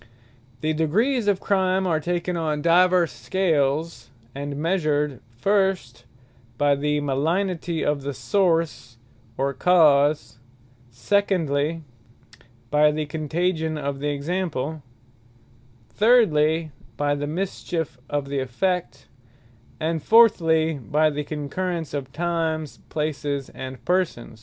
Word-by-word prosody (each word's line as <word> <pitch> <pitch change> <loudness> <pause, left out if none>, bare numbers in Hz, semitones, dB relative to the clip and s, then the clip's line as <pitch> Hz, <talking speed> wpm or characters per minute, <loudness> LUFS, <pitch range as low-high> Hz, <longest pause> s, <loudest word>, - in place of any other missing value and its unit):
The 155 0 0
Degrees 210 - +1
of 200 -2 +2
Crime 190 -1 +1
are 165 -4 +1
taken 175 +2 -2
on 155 -3 -2
divers 180 0 +4
Scales, 160 -4 -1 0.2
and 140 +1 -5
measured, 150 -5 0 0.2
First, 190 - 0 0.5
by 145 +1 +3
the 150 +1 0
malignity 165 +4 -1
of 145 -1 0
the 140 0 -4
Source, 165 - 0 0.4
or 140 +1 0
Cause: 145 -4 +3 0.5
Secondly, 160 - 0 0.9
by 150 +1 +5
the 155 0 -2
contagion 160 +2 -2
of 140 -1 -3
the 145 +1 -1
Example: 155 -1 -3 1.1
Thirdly, 165 - +3 0.3
by 145 +1 +1
the 145 0 -3
mischiefe 165 -3 -3
of 145 -1 -2
the 140 0 -2
Effect; 140 +3 -2 0.7
and 160 0 -1
Fourthly, 165 -9 +4
by 150 +6 +1
the 150 0 -3
concurrence 160 +3 -4
of 135 -2 -4
Times, 160 -1 -2
Places, 145 -3 -3
and 130 -1 -9
Persons. 175 -11 -1
155 Hz, 110 wpm, -23 LUFS, 145-180 Hz, 1.1 s, by